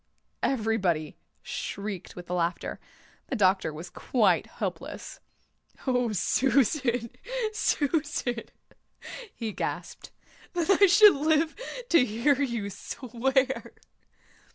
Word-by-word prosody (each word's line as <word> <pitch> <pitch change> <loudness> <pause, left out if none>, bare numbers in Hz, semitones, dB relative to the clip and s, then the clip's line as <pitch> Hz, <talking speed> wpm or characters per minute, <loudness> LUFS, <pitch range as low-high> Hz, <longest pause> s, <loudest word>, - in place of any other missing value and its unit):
Everybody 205 - 0 0.3
shrieked 200 -3 -5
with 180 0 -9
laughter. 175 -1 -1 0.5
The - - -2
doctor 190 -4 +3
was 165 +3 -8
quite 230 +4 +2
helpless. - - -6 0.7
"Oh, 250 -3 +1
Susan, 245 - +1 0.4
Susan," 290 - 0 0.9
he 225 -2 -4
gasped. - - -5 0.4
"That 350 +1 +1
I 400 +1 +6
should 410 +2 +8
live 310 +2 +2 0.3
to 335 - +6
hear 250 +5 +1
you 235 -7 -2
swear." 265 +5 -1
245 Hz, 90 wpm, -28 LUFS, 200-285 Hz, 0.9 s, should